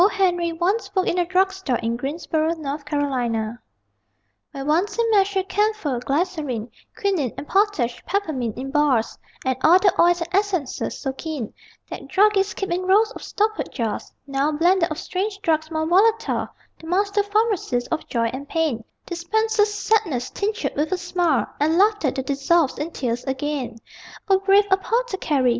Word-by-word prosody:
Henry" 350 -3 +1
once 360 +7 0
worked 375 -1 +2
in 360 - +1
a 350 - +1
drug 375 +1 +2
store 345 -11 -1
in 230 0 -2
Greensboro, 310 +4 -1
N.C.) 295 -1 -4 1.5
Where 275 -2 -6
once 355 +8 +1
he 465 - +2
measured 390 -2 +2
camphor, 415 - 0
glycerine, 275 - -2 0.3
Quinine 360 - 0
and 290 - -7
potash, 385 - +1
peppermint 300 - -2
in 270 +2 -5
bars, 285 -6 +2 0.3
And 260 0 +1
all 340 +3 +7
the 380 -1 +3
oils 350 0 +4
and 335 - -3
essences 375 -8 -1
so 270 -2 -3
keen 285 -5 -5 0.4
That - - -7
druggists 405 0 +3
keep 390 -2 -3
in 350 +1 0
rows 420 +3 +4
of - - -10
stoppered 430 +1 -1
jars 230 -5 -3
Now, 275 +2 0
blender 345 +3 +3
of 310 - -4
strange 390 +3 -3
drugs 315 -1 +1
more 315 -1 -1
volatile, 425 +7 +2 0.3
The 320 - -11
master 400 +3 +1
pharmacist 410 - 0
of 325 - -2
joy 230 -2 +1
and 280 +2 -7
pain 310 -9 0 0.2
Dispenses 420 +5 +1
sadness 410 - 0
tinctured 425 +3 -2
with 300 +4 -1
a 370 - +1
smile 350 -5 +1
And 315 +3 +2
laughter 415 -6 +3
that 265 0 -4
dissolves 280 +2 +1
in 300 +3 -2
tears 245 -6 -3
again. 265 -3 -3 0.5
O 385 -1 +5
brave 395 +1 +4
apothecary! 380 - +1
340 Hz, 160 wpm, -22 LUFS, 280-395 Hz, 1.5 s, all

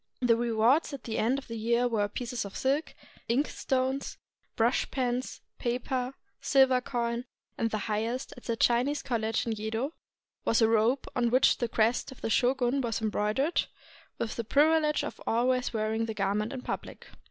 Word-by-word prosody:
The 245 -2 +4
rewards 235 +6 +2
at 275 - -7
the 225 -1 -3
end 245 +5 +2
of 275 - -7
the 230 -1 -5
year 235 +2 +2
were 215 -4 +1
pieces 240 +3 -4
of 200 -1 -7
silk, 280 +4 0 0.3
ink 265 +6 +2
stones, 265 +1 -1 0.4
brush 235 +3 +2
pens, 250 -1 -2 0.2
paper, 250 +2 -2 0.3
silver 265 -2 +4
coin; 235 -1 -2 0.3
and 225 - 0
the 220 - -1
highest, 225 +5 -2
at 245 - -14
the 230 - -1
Chinese 245 +6 +2
college 225 -4 -1
in 230 - -1
Yedo, 220 +5 -2 0.5
was 230 - +2
a 225 - +5
robe 230 +4 +2
on 240 -2 +2
which 255 +3 +4
the 240 - 0
crest 230 +3 +1
of 265 - -13
the 225 - -2
shogun 255 +2 +2
was 230 -4 -1
embroidered, 215 +8 0 0.5
with 225 - -3
the 235 - -1
privilege 300 +5 +3
of - - -6
always 250 +2 +1
wearing 220 0 -1
the 220 - -4
garment 205 +2 0
in 260 -2 -6
pubHc. - - -5
240 Hz, 175 wpm, -29 LUFS, 225-260 Hz, 0.5 s, a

